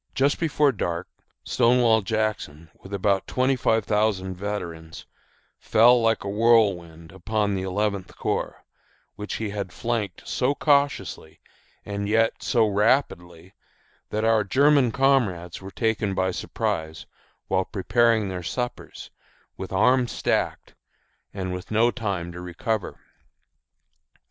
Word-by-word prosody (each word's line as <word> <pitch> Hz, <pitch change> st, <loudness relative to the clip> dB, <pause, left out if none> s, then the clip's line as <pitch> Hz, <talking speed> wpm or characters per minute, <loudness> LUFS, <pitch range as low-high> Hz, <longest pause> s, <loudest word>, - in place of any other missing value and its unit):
Just 140 Hz, +2 st, +2 dB
before 150 Hz, -3 st, +2 dB
dark 85 Hz, -7 st, -3 dB, 0.4 s
Stonewall 120 Hz, -2 st, +3 dB
Jackson, 105 Hz, -7 st, -3 dB
with 95 Hz, -, -13 dB
about 100 Hz, 0 st, 0 dB
twenty 130 Hz, +1 st, +1 dB
five 110 Hz, -3 st, +1 dB
thousand 105 Hz, -3 st, 0 dB
veterans, 85 Hz, -5 st, -6 dB, 0.5 s
fell 120 Hz, +2 st, +5 dB
like 115 Hz, -1 st, +1 dB
a -, -, -5 dB
whirlwind 100 Hz, -7 st, +1 dB
upon 105 Hz, +2 st, -1 dB
the 95 Hz, -, -2 dB
Eleventh 100 Hz, 0 st, -2 dB
Corps, -, -, -3 dB, 0.5 s
which 105 Hz, 0 st, -5 dB
he 110 Hz, -2 st, -3 dB
had 100 Hz, -3 st, -5 dB
flanked 115 Hz, -6 st, -3 dB
so 135 Hz, +3 st, 0 dB
cautiously 140 Hz, -, 0 dB, 0.5 s
and 100 Hz, 0 st, -4 dB
yet 115 Hz, +1 st, +1 dB
so 115 Hz, -2 st, +2 dB
rapidly 100 Hz, -5 st, 0 dB, 0.6 s
that 110 Hz, +1 st, -1 dB
our 110 Hz, -1 st, +3 dB
German 135 Hz, +3 st, +3 dB
comrades 115 Hz, -12 st, +1 dB
were 95 Hz, -, -8 dB
taken 110 Hz, -2 st, -1 dB
by 95 Hz, 0 st, 0 dB
surprise 80 Hz, -3 st, -3 dB, 0.4 s
while 95 Hz, -1 st, +1 dB
preparing 115 Hz, +2 st, +1 dB
their 90 Hz, -2 st, -4 dB
suppers, 120 Hz, +8 st, -5 dB, 0.4 s
with 95 Hz, -, -7 dB
arms 125 Hz, +5 st, +3 dB
stacked, -, -, -2 dB, 0.6 s
and 90 Hz, -2 st, -4 dB
no 115 Hz, +2 st, +3 dB
time 100 Hz, -8 st, -4 dB
to 90 Hz, +1 st, -9 dB
recover. 90 Hz, +4 st, -3 dB
105 Hz, 120 wpm, -24 LUFS, 95-115 Hz, 0.6 s, fell